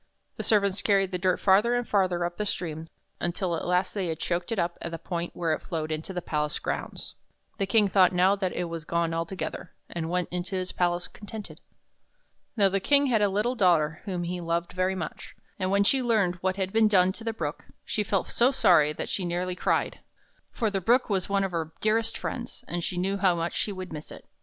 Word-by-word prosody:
The - - -3
servants 200 -2 +2
carried 195 -2 +2
the 180 - -2
dirt 185 0 +2
farther 205 +5 +4
and 245 -1 -1
farther 185 -4 +2
up 175 0 -4
the 210 - -1
stream, 160 -4 -3 0.3
until 175 +1 -1
ht - - -4
last 180 +1 +1
they 195 -4 -1
had 160 -1 -2
choked 175 +4 -2
it 225 - -1
up 170 -1 -1
at - - -4
the 165 - -5
point 170 +1 -4
where 165 -2 0
it - - -3
flowed 160 -2 -4
into 155 +4 -4
the 180 -2 -4
palace 150 -1 -1
grounds. - - -4 0.5
The 195 - 0
King 210 +1 +4
thought 190 -2 +5
now 185 +2 +4
that 190 -2 -1
it 180 - -2
was 165 -2 -5
gone 170 0 0
altogether, 165 +1 -4 0.2
and 165 -1 -3
went 180 0 0
into 180 +2 -3
his 185 0 -2
palace 175 0 0
con 205 - -13
tented. 215 0 -7 1.0
Now 200 -2 +5
the 195 +1 +1
King 285 +8 +4
had 220 - +3
a 205 - +4
little 210 +6 0
daughter, 170 -8 +2
whom 180 -4 -2
he 175 +1 -3
loved 170 0 -2
very 185 +1 0
much; 180 - -6 0.2
and 185 -1 0
when 200 +1 +3
she 265 +6 +3
learned 215 -7 +2
what 185 +1 -1
had 190 -1 -2
been 220 -1 +5
done 185 -3 +4
to 225 - -9
the 225 - -1
Brook, 155 -8 -5 0.2
she 215 - -1
felt 195 -2 -1
so 245 +3 +4
sorry 155 - +4
that - - -5
she 190 - -2
nearly 180 +1 -2
cried. - - 0 0.5
For 225 -4 -1
the 195 -1 -1
Brook 240 +4 +3
was 190 -1 0
one 200 0 +2
of 195 - -1
her 160 -2 -3
dearest 225 +1 +1
friends, 240 -2 -5
and 175 0 -3
she 180 - -3
knew 195 +2 0
how 190 -3 +3
much 170 0 -2
she 210 - -1
would 185 -3 -7
miss 150 0 -7
it. - - -11
185 Hz, 230 wpm, -27 LUFS, 170-200 Hz, 1.0 s, thought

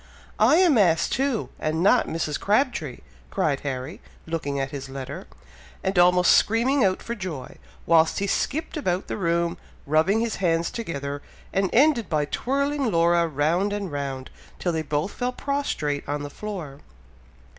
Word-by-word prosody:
"I - - +6
am 335 -8 +5
asked 170 -5 +3
too! 270 -4 0
and 160 +2 -1
not 235 +5 +4
Mrs. 155 -3 -2
Crabtree!" 205 - 0 0.3
cried 140 - 0
Harry, 135 +3 -5 0.2
looking 150 -4 -3
at 135 0 -2
his 135 -1 -6
letter, 135 +7 -7 0.6
and 190 -1 +1
almost 180 0 +5
screaming 240 +5 +3
out 185 -1 +1
for 235 - -4
joy, 180 - -6 0.3
whilst 165 -1 +4
he 200 - 0
skipped 285 +9 -1
about 185 -10 -1
the - - -4
room, 170 -3 0 0.3
rubbing 160 +9 +3
his 230 -2 -1
hands 170 -2 +1
together, 145 -10 -4 0.3
and 195 -1 +1
ended 255 -3 +3
by 150 -2 +1
twirling 275 - -1
Laura 170 0 +3
round 165 +7 0
and 200 -4 -3
round, 135 -2 -4 0.3
till 175 - -1
they 160 -1 -1
both 150 +5 -2
fell 250 0 -3
prostrate 250 - -2
on 145 0 -2
the 145 - -6
floor. 175 -10 -7
170 Hz, 155 wpm, -24 LUFS, 150-220 Hz, 0.6 s, I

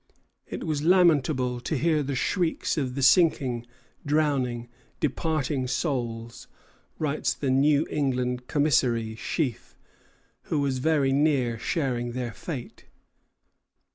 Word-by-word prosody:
"It - - -6
was 155 -2 -1
lamentable 150 -8 +3
to 145 +5 -2
hear 155 +2 +2
the 140 -1 -3
shrieks 170 +5 0
of 130 -4 -2
the 140 - -1
sinking, 130 -6 +3 0.4
drowning, 140 -6 0 0.3
departing 145 -5 -1
souls," 120 -4 -3 0.5
writes 150 -1 -1
the 135 -3 -1
New 145 +3 +3
England 125 -3 -1
commissary, 125 -7 +1
Sheaf, 125 +3 -3 0.7
who 155 - -1
was 135 -2 0
very 140 -2 +2
near 135 -5 +1
sharing 120 -5 -1
their 125 -2 -4
fate. 135 -8 -7
135 Hz, 110 wpm, -26 LUFS, 125-150 Hz, 0.7 s, lamentable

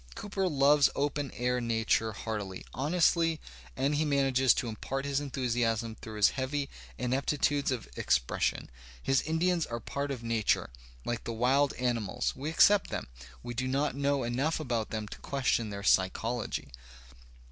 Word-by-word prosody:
Cooper 195 -2 -2
loves 145 -1 +5
open 145 0 -1
air 125 0 0
nature 115 -1 +1
heartily, 105 -3 -5
honestly, 165 +3 +2 0.4
and 140 +2 +1
he 150 +2 +2
manages 135 -3 +3
to 120 - -2
impart 135 +5 -4
his 140 -1 0
enthusiasm 120 -5 -1
through 110 0 -9
his 105 -1 +5
heavy 140 +1 -2 0.3
ineptitudes 140 +2 +1
of 130 -3 -2
ex - - +3
pression. - - -2 0.3
His 135 -1 +3
Indians 165 +2 +1
are 120 0 -4
part 140 +5 -4
of 130 -4 -4
nature, 115 - +1 0.3
like 120 -1 -2
the 115 - -3
wild 135 +5 +2
animals; 120 -2 -1
we 140 +4 -4
accept 200 +4 +5
them, - - -4 0.3
we 120 0 -5
do 130 +2 -2
not 140 +2 0
know 140 -1 +1
enough 130 +8 0
about 120 -7 -2
them 110 -1 -4
to - - -9
question 125 -5 0
their 100 -1 -6
"psychology." 100 - +1
130 Hz, 155 wpm, -30 LUFS, 115-145 Hz, 0.4 s, loves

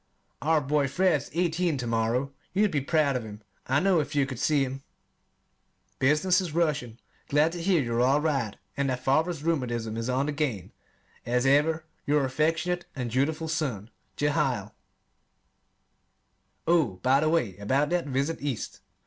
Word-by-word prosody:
Our 155 +2 +2
boy 145 0 +1
Fred 175 0 +2
is - - -11
eighteen 170 -1 0
to 125 - -4
morrow. 115 +4 0 0.2
You'd 205 +1 +2
be 145 - 0
proud 145 -1 +2
of 125 - -1
him, 105 -1 -10 0.2
I 130 +2 +3
know, 185 0 +3
if 145 - -3
you 140 -1 +3
could 130 -3 -7
see 150 -3 +2
him. 135 +1 -5 1.2
Business 155 +7 +3
is 170 -4 -5
rushing. 150 -9 0 0.3
Glad 150 +3 +3
to 175 0 -5
hear 170 -4 +2
you're 120 0 0
all 135 +4 +4
right 135 -9 -1 0.2
and 140 -1 0
that 125 0 -3
father's 155 +3 +1
rheumatism 120 -9 -1
is 115 +2 -3
on 130 +2 +1
the 150 - -1
gain. 140 - -2 0.5
As 125 +2 0
ever, 155 +4 +3 0.2
your 145 -1 +3
affectionate 160 +6 0
and 125 -3 -3
dutiful 155 +6 0
son, 130 -10 -3 0.3
JEHIEL 135 -8 0 1.9
Oh, 160 - +3
by 130 +2 +4
the 155 +1 +2
way 140 - +1
about 135 +10 0
that 175 -3 0
visit 140 +4 -1
East. 140 -6 -4
145 Hz, 165 wpm, -27 LUFS, 125-160 Hz, 1.9 s, all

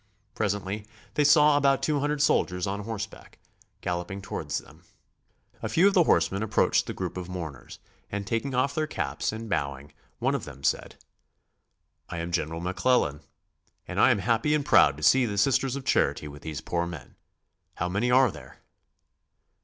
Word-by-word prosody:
Presently 105 0 -2 0.3
they 150 - +2
saw 150 0 +6
about 140 -1 +2
two 150 -2 +1
hundred 145 +1 0
soldiers 90 -10 +1
on 100 +1 -3
horseback 110 -2 -7 0.4
galloping 90 +2 -3
towards 100 - -4
them. - - -11 0.8
A - - -3
few 180 +4 +4
of 200 - +3
the 180 -4 +5
horsemen 85 - +2
approached 110 -3 +2
the - - -3
group - - -5
of 90 -1 -6
mourners 80 -9 -7 0.3
and 100 0 -3
taking 115 +6 -2
off 135 +3 +1
their 155 0 -1
caps 75 - -2
and 110 +1 -6
bowing 70 -7 -3 0.3
one - - 0
of - - -2
them 70 -1 -10
said: - - 0 1.1
"I - - -5
am 85 +1 -4
General 80 -1 -2
McClellan 90 - +1 0.7
and - - -3
I - - +6
am - - +4
happy 115 +9 +1
and 145 -2 -1
proud 75 - +5
to 75 - -9
see 130 +5 +5
the 100 -2 -4
Sisters 135 +3 +2
of 140 -2 -6
Charity 70 +2 +1
with 75 0 -10
these 80 -3 -5
poor 85 0 -2
men. 85 -3 -9 0.6
How 90 - -2
many 100 +7 0
are 130 -2 +5
here?" - - -13
100 Hz, 175 wpm, -27 LUFS, 85-130 Hz, 1.1 s, saw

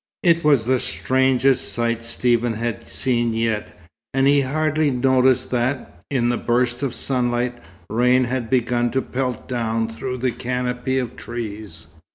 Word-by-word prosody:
It 170 -2 +4
was 140 -7 +4
the 130 +1 +2
strangest 130 +1 +1
sight 115 -1 -1
Stephen 120 0 +1
had 115 0 -4
seen 120 -3 0
yet, 115 -2 -2 0.4
and 135 0 +3
he 140 0 +5
hardly 155 +2 +1
noticed 130 0 +2
that, 125 -7 -2
in 120 -3 +1
a 120 - 0
burst 120 +1 0
of 130 -4 -2
sunlight, 125 -1 0 0.3
rain 125 +4 +3
had 125 -2 -2
begun 120 -1 +1
to 130 - +1
pelt 125 -2 -3
down 115 -2 -1
through 115 +3 -5
the 125 0 0
canopy 125 +1 -2
of 125 -3 -3
trees. 110 -6 -7
125 Hz, 150 wpm, -21 LUFS, 120-130 Hz, 0.4 s, he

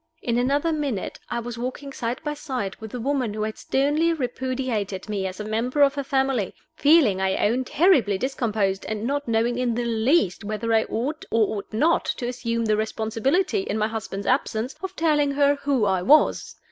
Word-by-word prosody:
In 235 0 +1
another 285 +6 +1
minute 280 -10 -3
I 240 - -2
was 235 0 -6
walking 265 +3 -5
side 240 0 -3
by 295 -1 -2
side 255 -10 -4
with 220 - -8
the 250 - -6
woman 255 -4 -1
who 215 - -2
had 215 0 -4
sternly 295 +5 +1
repudiated 250 - -3
me 200 -3 -2
as 185 +1 -7
a - - -3
member 240 +7 +1
of 280 -1 +4
her 280 -1 -3
family; 265 -6 0 0.2
feeling, 280 - +4
I 190 0 +1
own, 245 +4 0
terribly 270 - +3
discomposed, 215 -5 -1
and 215 -1 -3
not 285 +2 -1
knowing 230 +2 +1
in 245 -2 0
the 240 0 -1
least 225 - +1
whether 215 +2 -2
I 220 0 +3
ought 275 +7 -3
or 220 -1 +2
ought 200 - -8
not 305 +10 +2
to 240 - -3
assume 230 -2 -2
the 215 -1 +2
responsibility, 225 - 0
in 385 - -2
my 215 0 +1
husband's 205 -3 -5
absence, 250 -1 0
of 380 0 -5
telling 300 -3 +2
her 285 0 +4
who 275 -6 +1
I 190 -2 +1
was. 295 +12 +3
240 Hz, 195 wpm, -24 LUFS, 215-280 Hz, 0.2 s, of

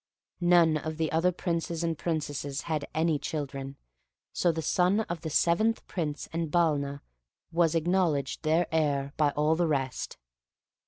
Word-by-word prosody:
None 175 -3 +5
of 155 +1 -5
the 160 -1 -1
other 165 +3 +3
Princes 170 -1 -2
and 165 -1 0
Princesses 145 -3 -3
had 155 -3 -3
any 160 -2 +1
children, 140 -3 -4 0.6
so 175 - +2
the 160 0 -4
son 185 +6 +2
of 170 -6 -5
the 160 - -4
seventh 175 +9 +2
Prince 150 -5 -3
and 165 -1 -1
Balna 145 -4 +1 0.5
was 170 -1 +2
acknowledged 165 -5 +1
their 160 +2 +2
heir 145 -3 0
by 150 -2 +3
all 150 +2 +3
the 170 0 +1
rest. 135 -4 -2
160 Hz, 150 wpm, -29 LUFS, 145-170 Hz, 0.6 s, None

